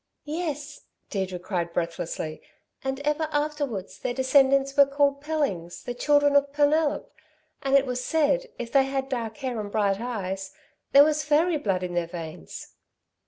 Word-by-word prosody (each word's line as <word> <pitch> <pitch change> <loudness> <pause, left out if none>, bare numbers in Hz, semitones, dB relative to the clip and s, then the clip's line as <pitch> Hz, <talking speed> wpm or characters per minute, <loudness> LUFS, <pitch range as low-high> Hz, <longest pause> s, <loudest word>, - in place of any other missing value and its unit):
"Yes," 300 -2 -4 0.3
Deirdre 190 -2 -2
cried 175 -2 -3
breathlessly, 165 -2 -3 0.4
"and 265 0 -2
ever 300 +2 0
afterwards 290 -9 -2
their 245 - -3
descendants 270 +1 +3
were 280 -1 +7
called 280 0 +1
Pellings, 280 - -2
the 245 - -4
children 290 +3 +3
of 285 0 +4
Penelop, 295 +1 +1 0.5
and 275 0 +2
it 275 0 +5
was 250 -1 -3
said, 320 - +1
if 235 -1 -6
they 270 -1 +5
had 270 0 -2
dark 235 -3 -3
hair 255 -5 -3
and 205 -1 -5
bright 200 -2 +1
eyes, 195 -5 -4 0.4
there 280 +1 +9
was 305 0 +1
fairy 310 +3 +3
blood 195 -9 -1
in 180 -1 -4
their 175 -1 0
veins." 160 - -8
270 Hz, 160 wpm, -26 LUFS, 195-290 Hz, 0.5 s, there